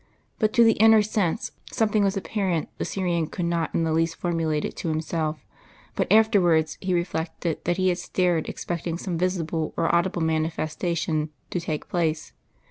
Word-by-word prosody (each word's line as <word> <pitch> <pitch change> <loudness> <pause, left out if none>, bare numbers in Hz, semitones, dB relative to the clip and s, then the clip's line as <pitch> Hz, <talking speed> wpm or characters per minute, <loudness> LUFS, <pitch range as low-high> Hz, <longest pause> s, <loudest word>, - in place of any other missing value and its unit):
But 215 -2 +2
to 235 - +6
the 225 -3 +4
inner 220 -1 +7
sense 210 0 -1 0.2
something 215 -3 +2
was 195 0 +1
apparent 190 -5 -1
the - - -1
Syrian 175 -4 -1
could 175 - -3
not 170 -2 -1
in 165 - +2
the 160 -1 0
least 165 +1 +1
formulate 165 -3 -1
it - - -5
to - - -4
himself; 155 0 -2 0.5
but - - -1
afterwards 180 -8 +4
he 185 -1 0
reflected 170 -1 -2
that 175 +1 +1
he 185 0 +2
had 180 0 0
stared 175 -2 0
expecting 170 -1 -4
some 180 -1 -4
visible 165 -3 -1
or 165 - +1
audible 170 0 +1
manifestation 160 0 -1 0.2
to 180 - -1
take 155 -3 -4
place. 160 -3 -1
170 Hz, 170 wpm, -25 LUFS, 160-185 Hz, 0.5 s, inner